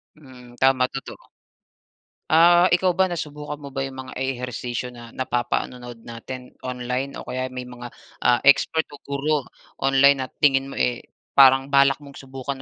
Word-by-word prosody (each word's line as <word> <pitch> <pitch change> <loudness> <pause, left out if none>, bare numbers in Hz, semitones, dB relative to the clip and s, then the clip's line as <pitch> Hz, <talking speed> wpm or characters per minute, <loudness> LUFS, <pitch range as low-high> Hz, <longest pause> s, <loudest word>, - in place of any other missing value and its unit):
Hmm, 125 -4 -16
tama 130 -1 +3
totoo. 135 - -8 1.1
Ah, 175 +2 +6
ikaw 180 0 +3
ba 190 0 +2
nasubukan 150 -3 -5
mo 145 - -9
ba 135 - -2
yung 135 -1 -7
mga - - -9
ehersisyo 125 -1 -4
na 120 -1 -11
napapanonood 120 -1 -3
natin 125 +2 -9
online 125 +2 -4
o - - -8
kaya 130 0 -3
may 125 0 -6
mga, 120 0 -9 0.3
ah, 120 -1 +5
expert 160 +3 +4
o - - -7
guro 140 +1 -1 0.4
online 135 0 +4
na - - -6
tingin 135 -2 +2
mo, - - -8
eh, 120 -1 0 0.3
parang 135 0 +6
balak 140 0 +5
mong 140 -2 -14
subukan 135 0 -6
135 Hz, 155 wpm, -23 LUFS, 125-140 Hz, 1.1 s, Ah